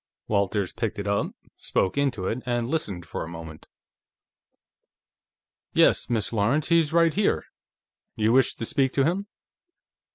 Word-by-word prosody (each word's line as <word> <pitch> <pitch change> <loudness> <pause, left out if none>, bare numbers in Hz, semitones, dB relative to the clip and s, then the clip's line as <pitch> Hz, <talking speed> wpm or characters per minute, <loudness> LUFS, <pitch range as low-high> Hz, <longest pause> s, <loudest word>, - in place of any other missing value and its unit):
Walters 100 -2 0
picked 110 -2 -3
it 100 - -4
up, 100 0 +1 0.3
spoke 95 - 0
into 140 -9 0
it, 115 +6 -2
and 120 -1 0
listened 105 - -2
for - - -5
a - - -7
moment. 80 -2 -9 2.1
"Yes, - - +4
Miss 115 -1 0
Lawrence; 120 +10 +1
he's 165 -3 +3
right 165 -1 +4
here. 205 +1 +1 0.7
You 110 +1 +2
wish 130 -1 +4
to 115 - -4
speak 135 +2 +1
to 135 - +3
him?" 190 +5 -1
115 Hz, 140 wpm, -25 LUFS, 100-145 Hz, 2.1 s, Yes